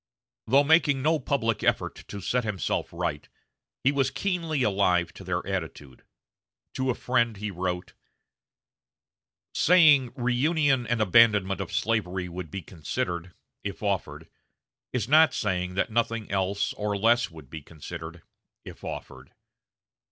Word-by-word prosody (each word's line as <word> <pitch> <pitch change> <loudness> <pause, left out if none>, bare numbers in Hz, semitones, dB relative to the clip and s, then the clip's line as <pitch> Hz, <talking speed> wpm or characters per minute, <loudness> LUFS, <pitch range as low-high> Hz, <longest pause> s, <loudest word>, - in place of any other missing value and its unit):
Though 135 +5 +5
making 145 -3 +3
no 160 +1 +2
public 120 -5 -1
effort - - -1
to 100 - -7
set 125 +6 0
himself 105 -4 -2
right, 85 -4 -4 0.5
he 135 - +4
was 135 -2 +1
keenly 165 -8 -1
alive 90 -5 +2
to - - -11
their 90 -1 -2
attitude. 80 -8 -5 0.7
To 130 0 -1
a 125 - +1
friend 120 -3 0
he 105 +1 -4
wrote: 90 0 -4 1.6
"Saying 155 -8 +5
reunion 130 +1 +1
and 120 0 0
abandonment 100 -2 +4
of 95 - -6
slavery 95 -5 -1
would 90 -1 -7
be 95 +3 -6
considered, 85 +2 -4 0.3
if 100 +1 -6
offered, 100 -3 -2 0.6
is 120 -5 -2
not 155 +3 +5
saying 90 -3 -1
that 100 - 0
nothing 115 -1 -1
else 100 +1 0
or 105 -1 -2
less 115 +1 +3
would 80 -6 -14
be 80 - -7
considered, 80 +2 -9 0.4
if - - -11
offered.... - - -8
105 Hz, 135 wpm, -27 LUFS, 90-125 Hz, 1.6 s, Though